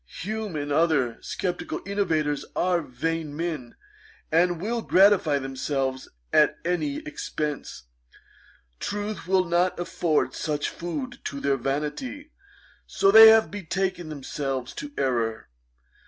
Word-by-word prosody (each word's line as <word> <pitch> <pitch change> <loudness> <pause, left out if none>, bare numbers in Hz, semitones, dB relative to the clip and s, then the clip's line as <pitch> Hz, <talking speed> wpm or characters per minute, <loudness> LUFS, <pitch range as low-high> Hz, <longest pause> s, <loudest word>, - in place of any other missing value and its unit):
Hume, 215 -2 -4
and 145 -1 -3
other 145 -6 +2
sceptical 180 -2 -3
innovators, 160 -8 0
are 180 -1 +2
vain 155 +2 -3
men, 160 -8 -4 0.6
and 175 +1 +3
will 230 +5 -2
gratify 190 -8 +4
themselves 135 0 -3 0.2
at - - +4
any 155 -5 -1
expence. 150 - -4 1.0
Truth 205 -3 -4
will 185 0 +3
not 175 +2 +1
afford 170 -2 0
sufficient 150 -2 -3
food 250 +9 -4
to 140 - -4
their 140 0 +1
vanity; 150 - -4 0.6
so 195 - +3
they 220 +1 +11
have 220 0 +6
betaken 190 -2 -3
themselves 135 -3 -4
to 290 0 -7
errour. 115 -4 -1
165 Hz, 115 wpm, -25 LUFS, 145-195 Hz, 1.0 s, they